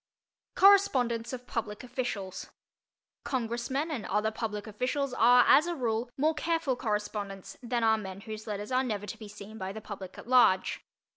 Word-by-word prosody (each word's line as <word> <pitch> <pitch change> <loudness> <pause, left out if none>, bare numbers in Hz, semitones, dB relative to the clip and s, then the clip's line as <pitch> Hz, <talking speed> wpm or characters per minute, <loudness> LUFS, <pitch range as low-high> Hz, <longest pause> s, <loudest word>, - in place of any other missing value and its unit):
CORRESPONDENCE 260 - +4
OF 250 -1 -6
PUBLIC 210 -2 -4
OFFICIALS 240 -7 -4 0.7
Congressmen 260 +4 -2
and 245 -9 -4
other 210 +2 +1
public 210 -2 -4
officials 250 +5 -2
are 245 +1 +6
as 310 +4 +6
a 345 - -2
rule 235 -3 -1
more 310 +4 +2
careful 325 -3 0
correspondents 210 -3 -4
than 240 -1 -1
are 220 -1 +4
men 190 -1 -7
whose 215 0 -8
letters 210 +2 -4
are 255 +1 +2
never 210 -5 -3
to 225 +2 -7
be 215 - -8
seen 210 +1 -10
by 190 0 -4
the 215 - -7
public 195 -3 -9
at - - -10
large. 245 -7 +4
230 Hz, 165 wpm, -29 LUFS, 210-255 Hz, 0.7 s, are